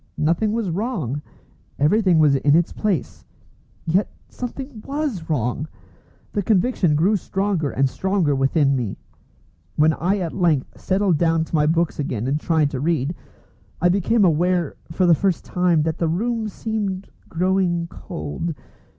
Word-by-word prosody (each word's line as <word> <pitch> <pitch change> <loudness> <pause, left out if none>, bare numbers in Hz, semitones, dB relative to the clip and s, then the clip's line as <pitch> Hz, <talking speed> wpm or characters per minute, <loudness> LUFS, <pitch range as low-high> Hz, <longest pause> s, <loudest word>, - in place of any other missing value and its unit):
Nothing 170 +8 +1
was 220 -5 -1
wrong; 165 - -2 0.6
everything 180 +4 +3
was 150 -3 +5
in 145 +2 +3
its 170 0 +2
place. 200 -10 -2 0.6
Yet 180 +5 +1 0.2
something 250 -1 -7
was 275 - -3
wrong! 135 +1 -1 0.7
The 205 - 0
conviction 195 -5 +2
grew 185 +8 +3
stronger 195 -5 -1
and 135 0 +1
stronger 185 0 0
within 135 +1 +2
me. 120 -7 -3 0.8
When 155 +1 +4
I 185 +6 0
at 175 -4 -3
length 165 -8 0
settled 190 -4 +1
down 165 -1 +2
to - - -18
my 150 -1 +3
books 165 0 +1
again 125 -6 -2
and 145 +3 0
tried 155 -3 +1
to 130 - -3
read, 155 0 0 0.7
I 175 - +3
became 200 +3 +3
aware, 175 0 +1 0.2
for 185 +3 +1
the 175 - +6
first 185 +1 0
time, 175 -4 +2
that 160 0 -2
the 170 - +1
room 220 +7 -1
seemed 200 -2 -3 0.2
growing 180 -1 +1
cold. 145 - -5
170 Hz, 150 wpm, -22 LUFS, 150-195 Hz, 0.8 s, the